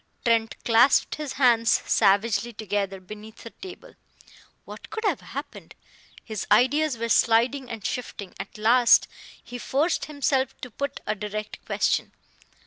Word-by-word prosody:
Trent 230 -2 +2
clasped 240 +4 +4
his 300 -3 -5
hands 235 -4 +3 0.2
savagely 215 +3 +2
together 205 -2 -3
beneath 215 +3 -12
the 230 - -9
table. 385 +7 -12 0.7
What - - -11
could 440 - -5
have - - 0
happened? - - -9 0.5
His 220 -3 -5
ideas 290 +1 +3
were 230 +1 -2
sliding 240 +4 +2
and 225 -3 -7
shifting. 210 -6 -5
At 195 +2 -8
last 235 +3 +5 0.4
he 245 +1 -8
forced 285 +9 0
himself 270 -3 -1
to 250 - -8
put 280 +5 -5
a 210 - 0
direct 210 +1 -6
question. - - 0
230 Hz, 135 wpm, -25 LUFS, 215-265 Hz, 0.7 s, last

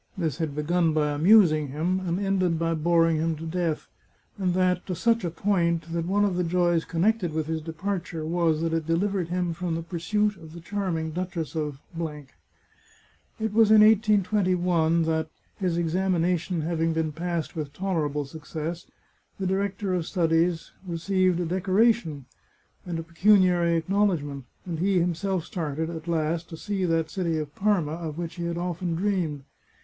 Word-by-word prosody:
This 160 -7 -2
had 155 -4 -2
begun 165 +2 +1
by 150 -1 +1
amusing 155 -1 +5
him, 165 +7 -1
and 180 -1 -2
ended 190 -4 +1
by 165 0 0
boring 165 0 +3
him 160 +1 0
to 160 +2 -8
death; 165 -1 -2 0.5
and 180 -2 0
that 185 -1 +2
to 185 - -2
such 230 +6 +2
a 175 - 0
point 170 -2 0
that 170 0 -1
one 205 +2 +2
of 195 -3 0
the 180 - +1
joys 175 -1 +1
connected 180 0 +1
with 155 -1 -1
his 160 0 -2
departure 165 0 -4
was 165 -1 +1
that 165 0 -1
it 165 -1 -1
delivered 185 +1 0
him 175 -1 -1
from 170 0 -3
the 165 - -3
pursuit 200 +5 -1
of 160 -2 -12
the 170 - -8
charming 170 -3 -2
Duchess 175 -2 -4
of. 150 -3 -3
It 160 +7 -9
was 220 -1 +5
in 215 -1 +8
1821 185 -6 +3
that, 160 -1 0 0.3
his 180 -4 -1
examination 175 0 0
having 165 0 0
been 160 -1 -1
passed 170 +1 -3
with 150 -3 -4
tolerable 150 -5 -1
success, 160 +3 -6 0.5
the 190 - -2
director 195 +1 -1
of - - +2
his 165 - -5
studies 165 -1 +1 0.2
received 180 +1 +1
a 175 - -1
decoration 185 - +1 0.6
and 170 -2 -3
a 165 - -4
pecuniary 175 0 +3
acknowledgment, 165 -7 0 0.2
and 170 -3 -4
he 190 +1 +2
him 175 0 +1
self 185 0 -2
started, 160 -1 -3
at 165 0 -7
last, 165 0 -1
to 165 - -8
see 195 +1 -2
that 165 -2 0
city 170 -4 -1
of 150 -1 -4
Parma 195 -7 +1
of 160 -1 -5
which 170 0 -5
he 170 - -3
had 170 0 -2
often 175 -1 -2
dreamed. 170 -6 -1
170 Hz, 170 wpm, -26 LUFS, 160-185 Hz, 0.6 s, in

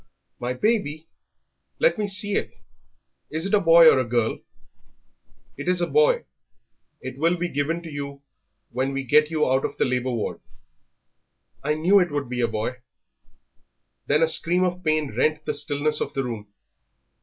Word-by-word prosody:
"My 125 +1 -2
baby! 160 - -1 0.7
Let - - +2
me 210 - 0
see 205 +1 0
it; - - -2 0.7
is 160 +3 -3
it 195 - -3
a 210 - +6
boy 165 -2 +7
or 135 - +6
a - - +1
girl?" 120 -2 -1 1.2
"It - - -7
is 180 0 +2
a 175 - +1
boy; 475 - +3 0.8
it 130 +1 -8
will 165 +3 +2
be 175 +1 -2
given 165 +3 -2
to 165 - -8
you 140 -1 -7 0.5
when 130 +3 -2
we 135 0 -2
get 150 +4 +4
you 155 -2 0
out 130 +1 +1
of - - -4
the - - +2
labour 125 0 -1
ward." 115 -4 -3 1.2
"I 150 +2 0
knew 180 +6 +4
it 180 -2 +1
would 145 -3 -3
be 125 -1 -2
a 120 - +2
boy." 115 +4 -3 1.3
Then 150 +3 +3
a - - +4
scream 175 +3 +3
of 180 0 -2
pain 155 -5 0
rent 155 +4 0
the - - -1
stillness 150 0 -1
of - - -4
the 135 - 0
room. 115 -4 -6
150 Hz, 175 wpm, -24 LUFS, 130-175 Hz, 1.3 s, boy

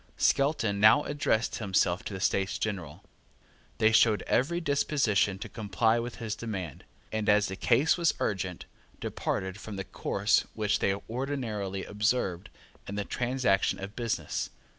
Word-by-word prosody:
Skelton 115 -8 +2
now 110 +8 +7
addressed 145 -6 0
himself 95 -3 +1
to - - -5
the - - -5
States 95 0 0
General. 90 -9 -4 0.7
They 110 -1 +4
showed 110 -1 +4
every 160 +8 +1
disposition 140 - +1
to - - -7
comply 110 +2 +1
with 120 0 -5
his 115 -3 -4
demand, 95 - -6 0.3
and, 110 -1 -1
as 105 0 +5
the 95 - -4
case 130 - +3
was 170 -2 +2
urgent, 95 -3 -2 0.3
departed 95 +1 -3
from 105 -1 -7
the 95 - -4
course 100 +4 +1 0.2
which 105 -2 +1
they 95 - +1
ordinarily 110 -7 -3
observed 105 -4 -1 0.4
in 100 - -5
the 100 -1 -2
transaction 125 -6 +1
of 100 +2 -8
business. 115 -3 -2
105 Hz, 145 wpm, -29 LUFS, 100-120 Hz, 0.7 s, now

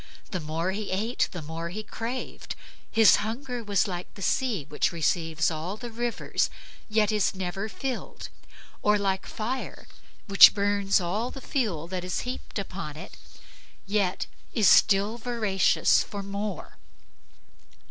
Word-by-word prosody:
The 185 - -1
more 165 +3 -2
he 205 +1 -4
ate 215 +6 0
the 175 -4 -6
more 165 +2 -5
he 215 +5 -5
craved. 235 +4 -5 0.3
His 225 -1 +6
hunger 235 +3 -4
was 205 0 +1
like 180 -2 -5
the 195 - -7
sea, 225 - 0
which 150 - 0
receives 165 0 +1
all 165 +6 -4
the 240 +1 -7
rivers, 240 +1 -1 0.4
yet 215 -1 +3
is 210 -2 +1
never 190 +3 -3
filled; 260 +2 -5 0.5
or 210 0 +4
like 195 -1 -1
fire, 250 +4 -4 0.4
that 195 -1 +9
burns 200 -1 +2
all 200 +7 -1
the 270 - -8
fuel 215 - -1
that 185 -1 -3
is 180 -1 -2
heaped 250 -1 -6
upon 185 -6 -5
it, 180 - -9 0.7
yet 200 -2 0 0.3
is 215 -4 +4
still 205 +5 +5
voracious 220 -6 +3
for 200 -1 -6
more. 200 -1 -5
200 Hz, 140 wpm, -27 LUFS, 180-220 Hz, 0.7 s, that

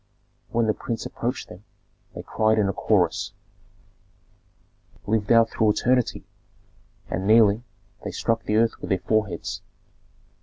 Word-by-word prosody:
When 115 0 +1
the 110 - +2
prince 115 +1 -5
approached 125 +3 -4
them, 95 - -13 0.5
they - - -6
cried 110 0 +1
in 105 -2 +3
a 100 - -1
chorus, - - +1 1.7
"Live 105 0 0
thou 115 -1 +6
through 110 -1 +1
eternity!" 125 +1 0 0.8
and 95 +2 -3
kneeling, 110 +1 +5 0.4
they - - -4
struck 115 0 0
the 105 - 0
earth 115 0 +2
with - - -6
their 95 - +2
foreheads. 105 -3 -2
110 Hz, 130 wpm, -24 LUFS, 105-115 Hz, 1.7 s, thou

